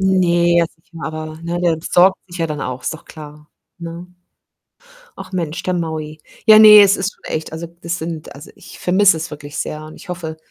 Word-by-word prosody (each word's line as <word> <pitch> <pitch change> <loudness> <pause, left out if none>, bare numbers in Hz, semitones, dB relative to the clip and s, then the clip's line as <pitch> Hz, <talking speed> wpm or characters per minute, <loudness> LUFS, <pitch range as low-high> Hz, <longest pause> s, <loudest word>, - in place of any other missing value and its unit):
Ne, 175 -2 +2
jetzt 170 -1 0
nicht 165 - -33
mehr, 165 - -7
aber 155 0 -7
ne, 170 +1 -3
der 170 -2 +2
sorgt 180 +3 +3
sich 175 0 -9
ja 165 - 0
dann 150 -2 -5
auch, 130 -1 -5
ist - - -3
doch 160 - -13
klar, 150 -1 -13 0.3
ne? 170 +1 -8 1.1
Ach - - -10
Mensch, 170 -3 -3
der 185 - -1
Maui. 160 -3 -4 0.2
Ja, 215 -1 +8
ne, 210 -1 +10
es 200 0 +4
ist 190 +2 -2
schon - - -33
echt 160 0 -4
also, 165 +1 -6
das 170 +1 -3
sind 160 -1 -6
also, 140 +3 -12
ich - - -14
vermisse 185 0 +4
es 160 +2 -5
wirklich 145 0 -9
sehr 150 0 -4
und 155 - -12
ich - - -11
hoffe 165 -3 -6
170 Hz, 215 wpm, -18 LUFS, 155-180 Hz, 1.1 s, ne